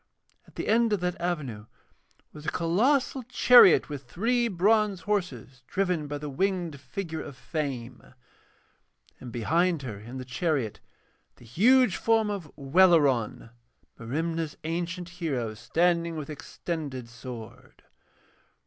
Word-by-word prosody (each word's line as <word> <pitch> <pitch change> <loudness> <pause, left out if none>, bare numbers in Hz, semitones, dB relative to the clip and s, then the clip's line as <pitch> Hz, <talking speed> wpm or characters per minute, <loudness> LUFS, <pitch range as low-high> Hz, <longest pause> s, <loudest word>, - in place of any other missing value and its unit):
At - - -21
the - - -4
end 225 0 +3
of 205 - +1
that 180 -1 -2
avenue 140 -12 -3 0.7
was 150 0 -10
a - - +1
colossal 250 - +1
chariot 250 -5 +6
with 140 -4 -8
three 235 - +1
bronze 205 0 +2
horses 145 - -3
driven 180 -4 -1
by 145 0 -4
the 150 +1 -6
winged 175 0 -1
figure 160 +1 -5
of 140 -3 -9
Fame, 130 -6 -5 1.0
and 125 - -9
behind 160 +7 +1
her 110 -6 -6
in 120 +5 -9
the 130 - -6
chariot 130 - -1 0.6
the 120 - -17
huge 225 - +4
form 225 -2 +2
of 185 -7 -6
Welleran, 140 - +3 0.5
Merimna's 160 +6 -3
ancient 170 +2 -3
hero, 145 -11 -3
standing 170 +7 0
with 155 0 -6
extended 145 -4 -5
sword. 120 -1 -11
165 Hz, 125 wpm, -27 LUFS, 130-185 Hz, 1.0 s, chariot